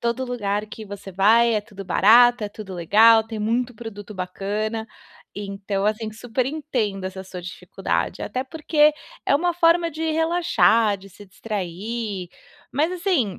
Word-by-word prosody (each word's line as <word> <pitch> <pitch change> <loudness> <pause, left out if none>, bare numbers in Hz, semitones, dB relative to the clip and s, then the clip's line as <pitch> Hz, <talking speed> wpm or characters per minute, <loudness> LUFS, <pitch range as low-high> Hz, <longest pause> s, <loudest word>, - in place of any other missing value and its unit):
todo 235 +2 -1
lugar 210 -4 -2
que 220 +1 -9
você 200 -1 -9
vai 225 +5 +4
é 210 - +1
tudo 200 -1 -11
barato, 240 +4 +5
é 205 - -3
tudo 205 -3 -9
legal, 220 +6 +5
tem 225 -1 -7
muito 240 +3 -1
produto 210 -2 -9
bacana. 205 +4 -3 0.5
Então, 200 0 -4
assim, 215 +1 -1
super 245 +3 -2
entendo 245 -10 -2
essa 190 0 -5
sua 185 -1 -9
dificuldade, 180 - -3
até 255 - -3
porque 300 0 +2 0.3
é - - +4
uma 350 +4 +2
forma 335 0 +3
de 315 +2 -6
relaxar, 230 - +3
de 195 +1 -14
se 205 +2 -14
distrair, 200 0 -5 0.4
mas, 305 +6 +1
assim, 340 - 0
220 Hz, 150 wpm, -23 LUFS, 200-250 Hz, 0.5 s, barato